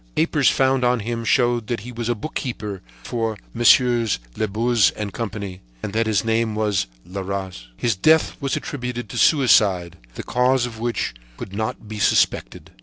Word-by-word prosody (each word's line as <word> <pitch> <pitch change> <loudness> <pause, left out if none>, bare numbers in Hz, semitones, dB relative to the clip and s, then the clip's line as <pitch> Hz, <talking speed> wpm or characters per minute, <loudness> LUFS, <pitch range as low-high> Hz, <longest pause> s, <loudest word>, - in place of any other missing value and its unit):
Papers - - +3
found 130 -1 +2
on 125 -1 +2
him 115 +2 -3
showed 120 -1 +2
that 120 -4 -2
he 125 +3 -8
was 120 -1 -4
a 120 - +1
bookkeeper 110 -6 -5 0.2
for 115 - -2 0.2
Messieurs 120 -1 +4 0.2
Labuze 110 -2 +2
and 105 -3 -4
Company 100 -3 -5 0.2
and 100 - -4
that 115 0 +1
his 110 0 +1
name 115 -1 +1
was 105 - 0 0.2
Leras. 95 -6 -5
His 115 -3 0
death 155 - +3
was 135 -1 -1
attributed 125 -4 -5
to - - -6
suicide, 100 - +4 0.2
the - - -6
cause 125 +1 +2
of 115 -2 -8
which 120 0 -2 0.2
could 95 - -8
not 110 +1 -4
be 105 0 -6
suspected. - - +1
115 Hz, 165 wpm, -22 LUFS, 100-120 Hz, 0.2 s, Messieurs